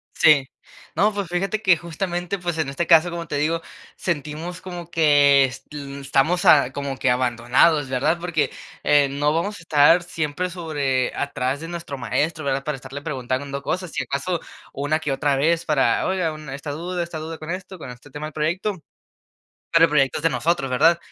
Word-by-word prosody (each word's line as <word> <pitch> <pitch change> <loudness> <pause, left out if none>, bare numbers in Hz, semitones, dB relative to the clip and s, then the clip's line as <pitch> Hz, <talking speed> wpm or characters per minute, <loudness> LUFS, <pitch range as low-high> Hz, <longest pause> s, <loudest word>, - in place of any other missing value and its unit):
Sí. 150 -4 +5 0.5
No, 205 +5 +3
pues 200 -2 -3
fíjate 195 +5 -1
que 185 -3 +5
justamente, 175 +3 -3
pues 175 -2 -3
en 155 -4 -1
este 160 +5 -2
caso, 170 +1 +6
como 170 -1 -5
te - - -3
digo, 160 +3 0 0.3
sentimos 165 +2 -4
como 175 -2 -8
que 145 -4 +5
es, 130 - -7
mm, 140 -1 -7
estamos 140 +6 +1
a 140 -3 +6
como 140 -2 -4
que 125 - +2
abandonados, 125 +4 +2
¿verdad?, 130 +6 +1
porque, 170 -3 0 0.3
eh, 145 -1 +4
no 145 +2 +1
vamos 200 +6 -1
a - - -13
estar 160 +2 +5
siempre 165 +1 -3
sobre 145 -7 -1
atrás 135 -1 -2
de 165 - -7
nuestro 170 -5 -6
maestro, 155 +5 -1
¿verdad?, 135 0 -1
para 150 0 -2
estarle 135 +2 -8
preguntando 140 -1 -3
cosas, 185 +3 -3
si - - -2
acaso 160 +6 -2 0.3
una 145 +3 0
que 150 -3 -3
otra 140 +1 +1
vez 165 +4 +1
para: 135 -6 +2
"Oiga 180 -4 0
un 155 -2 -9
esta 140 +2 -5
duda 175 +4 -3
esta 170 -2 -6
duda 160 +1 -6
con 155 +1 -7
esto, 185 +1 -6
con 155 - -9
este 125 +4 -14
tema 150 +3 -6
del 155 - -7
proyecto". 175 +7 -1 1.0
Pero 165 0 +6
el - - -8
proyectos 145 0 +2
de 165 - +3
nosotros, 135 +1 0
¿verdad?, 165 +6 +4
155 Hz, 190 wpm, -22 LUFS, 140-170 Hz, 1.0 s, caso